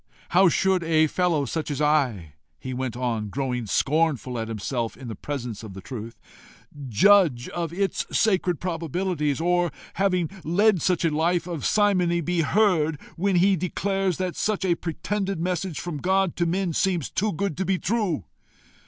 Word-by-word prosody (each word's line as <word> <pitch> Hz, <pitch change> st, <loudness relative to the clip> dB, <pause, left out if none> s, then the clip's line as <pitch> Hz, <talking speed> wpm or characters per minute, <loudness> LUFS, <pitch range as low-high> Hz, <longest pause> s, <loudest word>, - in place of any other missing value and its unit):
How 185 Hz, +1 st, +5 dB
should 190 Hz, +2 st, +2 dB
such 165 Hz, -, -5 dB
a 160 Hz, -1 st, +5 dB
fellow 170 Hz, -2 st, +1 dB
as 145 Hz, +1 st, -3 dB
I" 130 Hz, -, +1 dB, 0.2 s
he 130 Hz, -, -6 dB
went 125 Hz, -2 st, -3 dB
on, 115 Hz, -4 st, -2 dB
growing 125 Hz, -1 st, -2 dB
scornful 135 Hz, -1 st, +1 dB
at 110 Hz, -, -3 dB
himself 115 Hz, +2 st, -3 dB
in 130 Hz, -3 st, -8 dB
the 110 Hz, -, -5 dB
presence 125 Hz, -4 st, -5 dB
of 105 Hz, -4 st, -9 dB
the 95 Hz, -, -8 dB
truth 115 Hz, 0 st, -8 dB, 0.7 s
"judge 150 Hz, -, +4 dB
of 170 Hz, -2 st, -3 dB
its 195 Hz, +3 st, -1 dB
sacred 185 Hz, -6 st, +2 dB
probabilities? 165 Hz, -3 st, -2 dB
or, 175 Hz, 0 st, +1 dB, 0.2 s
having 185 Hz, -3 st, +1 dB, 0.2 s
led 185 Hz, +3 st, +3 dB
such 180 Hz, -3 st, +1 dB
a 165 Hz, -, +2 dB
life 170 Hz, +2 st, +1 dB
of 170 Hz, -5 st, -5 dB
simony, 185 Hz, -5 st, +2 dB
be 175 Hz, +1 st, 0 dB
heard 160 Hz, -4 st, +2 dB, 0.2 s
when 195 Hz, +2 st, +1 dB
he 190 Hz, +3 st, +4 dB
declares 190 Hz, +1 st, -1 dB
that 185 Hz, -2 st, -2 dB
such 210 Hz, -2 st, -1 dB
a 180 Hz, -, +3 dB
pretended 190 Hz, +3 st, -3 dB
message 180 Hz, -1 st, -2 dB
from 175 Hz, -4 st, -4 dB
God 190 Hz, +1 st, +1 dB
to 170 Hz, -, +1 dB
men 180 Hz, 0 st, 0 dB
seems 175 Hz, -4 st, 0 dB
too 210 Hz, +2 st, 0 dB
good 195 Hz, -1 st, -2 dB
to 190 Hz, -, 0 dB
be 190 Hz, 0 st, +1 dB
true? 190 Hz, -, -1 dB
170 Hz, 170 wpm, -25 LUFS, 140-185 Hz, 0.7 s, How